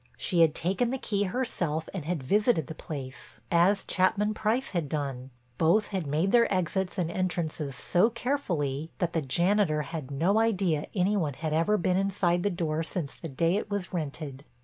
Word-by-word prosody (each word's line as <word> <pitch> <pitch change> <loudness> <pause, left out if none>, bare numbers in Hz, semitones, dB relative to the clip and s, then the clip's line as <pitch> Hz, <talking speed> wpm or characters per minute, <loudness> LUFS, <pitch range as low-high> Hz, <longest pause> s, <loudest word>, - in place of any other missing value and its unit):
She 175 -3 +1
had 160 -2 +5
taken 195 +8 0
the 265 - -1
key 205 -5 -1
herself 180 -8 -2
and 180 -6 -5
had 165 -4 -2
visited 205 - +2
the 160 - -7
place, 140 -4 -8
as 180 +4 +4
Chapman 205 +3 +1
Price 220 +5 0
had 170 -6 -2
done. 135 -4 -3 0.3
Both 170 +7 +3
had 190 -6 -3
made 160 +7 +1
their 235 -1 +4
exits 185 +1 -1
and 170 -3 0
entrances 170 -6 -2
so 180 - +3
carefully 175 - -2
that 170 -2 -1
the 165 - +1
janitor 170 +2 +2
had 150 -4 -6
no 170 +10 +2
idea 190 -9 +1
any 195 +2 +2
one 150 -8 -1
had 155 +1 -3
ever 170 +7 +3
been 180 0 +1
inside 185 -3 +1
the 205 - +1
door 165 -4 -1
since 160 -2 -4
the 165 - -8
day 165 +7 +1
it 210 - -4
was 200 -3 -3
rented. 145 -4 -4
175 Hz, 185 wpm, -28 LUFS, 155-200 Hz, 0.3 s, had